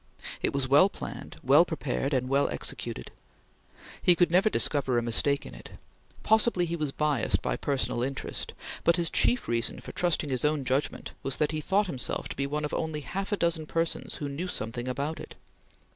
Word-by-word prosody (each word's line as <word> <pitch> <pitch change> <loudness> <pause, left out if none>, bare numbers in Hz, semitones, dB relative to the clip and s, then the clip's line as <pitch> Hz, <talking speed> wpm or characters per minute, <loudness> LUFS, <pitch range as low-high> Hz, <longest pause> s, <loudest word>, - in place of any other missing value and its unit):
It - - +2
was 135 -1 -1
well 145 +9 +6
planned, - - -8
well - - +7
prepared, 60 - -2
and 130 -2 +1
well 140 +2 +2
executed. - - -5 0.9
He 175 - +6
could 175 -1 +3
never 190 +5 +5
discover 135 - +1
a - - +3
mistake 140 +5 +1
in - - -9
it. - - -11 0.5
Possibly 220 -4 +3
he 170 0 -2
was 155 -4 -2
biassed 150 -4 0
by - - 0
personal 135 - -1
interest, 135 +2 -3 0.3
but 170 - +5
his 170 -1 +1
chief 245 - +2
reason 115 0 -1
for - - -8
trusting 170 -5 0
his 130 -2 0
own 150 -2 +1
judgment 130 +3 -1
was 135 -1 0
that 150 0 +1
he 155 -1 -2
thought 200 +6 +2
himself 145 -9 -3
to - - -5
be 140 0 -1
one 150 +1 -2
of 150 - -5
only 160 -2 -2
half 195 +9 -4
a 205 - +1
dozen 165 -3 0
persons 165 +1 -2
who 145 - -4
knew 145 +6 -4
something 120 -5 -4
about 140 +5 -2
it. - - -9
150 Hz, 195 wpm, -28 LUFS, 130-170 Hz, 0.9 s, well